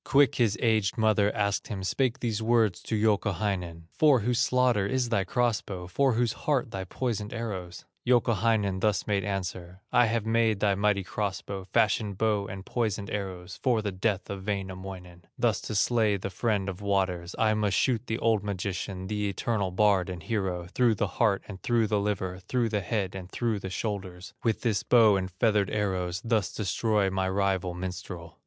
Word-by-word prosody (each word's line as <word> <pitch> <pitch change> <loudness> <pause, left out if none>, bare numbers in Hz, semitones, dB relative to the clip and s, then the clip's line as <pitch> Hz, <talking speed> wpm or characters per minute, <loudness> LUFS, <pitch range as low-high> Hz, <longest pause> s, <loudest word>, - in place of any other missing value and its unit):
Quick 140 -2 +4
his 115 -3 +1
aged 110 -2 +2
mother 110 -2 +3
asked 100 -2 0
him, 100 -4 -5
Spake 130 +5 0
these 115 -2 -1
words 110 -4 +2
to 110 - -3
Youkahainen: 100 -5 0
"For 145 -6 +4
whose 120 +3 0
slaughter 125 -5 +2
is 125 +1 0
thy 100 -4 +2
cross 120 +2 +1
bow, 90 -3 -7
For 130 +8 +2
whose 115 -1 +1
heart 135 -6 -1
thy 95 -2 -4
poisoned 110 0 -3
arrows?" 95 -7 -5 0.2
Youkahainen 110 -5 +2
thus 105 0 +1
made 100 -2 0
answer: 90 -2 -4
"I 120 -1 +5
have 110 -1 -1
made 115 -2 +2
this 100 -1 +2
mighty 100 0 +1
cross 100 0 -3
bow, 95 -1 -6
Fashioned 105 0 +1
bow 105 -2 +1
and 95 0 -7
poisoned 110 -4 -2
arrows 95 -3 -5
For 120 -5 +2
the 105 - -1
death 95 +1 -1
of 95 0 -7
Wainamoinen, 95 -3 -5
Thus 120 -3 +1
to 110 - -5
slay 110 -1 +2
the 95 +1 -5
friend 105 -1 0
of 95 0 -5
waters; 95 -3 -1
I 110 -1 +3
must 105 -3 +1
shoot 125 -2 +1
the 110 - -1
old 110 -3 +2
magician, 95 -1 -4
The 105 0 -1
eternal 100 -1 -1
bard 95 -1 +2
and 90 -3 -6
hero, 95 -4 -2
Through 120 -3 +3
the 100 - 0
heart, 100 0 +1
and 95 -3 -9
through 120 +1 +2
the 105 -1 +1
liver, 95 -3 -2
Through 115 +5 -1
the 105 -2 0
head, 95 -1 -2
and 95 -1 -7
through 115 -4 -1
the 95 - -6
shoulders, 95 -1 -5
With 115 -2 0
this 110 -5 +1
bow 115 -4 +5
and 95 -1 -1
feathered 105 +1 +1
arrows 90 -4 -1
Thus 110 -5 +1
destroy 105 -1 0
my 95 0 0
rival 95 -2 0
minstrel." 90 -2 -7
100 Hz, 185 wpm, -28 LUFS, 95-115 Hz, 0.2 s, I